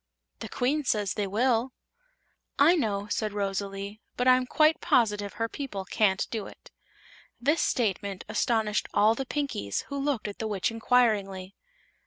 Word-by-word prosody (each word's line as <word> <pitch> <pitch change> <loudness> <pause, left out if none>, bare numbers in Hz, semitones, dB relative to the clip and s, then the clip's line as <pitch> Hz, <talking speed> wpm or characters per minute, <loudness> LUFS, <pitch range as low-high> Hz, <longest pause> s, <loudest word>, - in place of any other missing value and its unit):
"The - - -7
Queen 285 +5 0
says 210 -6 0
they 205 -1 -2
will." 235 +4 +1 0.8
"I 315 +6 +6
know," 205 - -1
said 215 0 -1
Rosalie; 200 +1 -4 0.2
"but 250 - +1
I'm 255 0 +5
quite 310 +3 +3
positive 210 -4 +1
her 225 +2 -2
people 225 -7 -6
can't 190 0 +1
do 220 -3 -3
it." - - -15 0.7
This 295 +6 +2
statement 200 -5 -1
astonished 220 -4 0
all 215 +2 +5
the 265 +3 -5
Pinkies, 275 - -2
who 280 - -4
looked 275 -6 -1
at 205 - -8
the 220 - -2
Witch 205 0 -1
inquiringly. 210 -5 +1
220 Hz, 150 wpm, -27 LUFS, 200-255 Hz, 0.8 s, I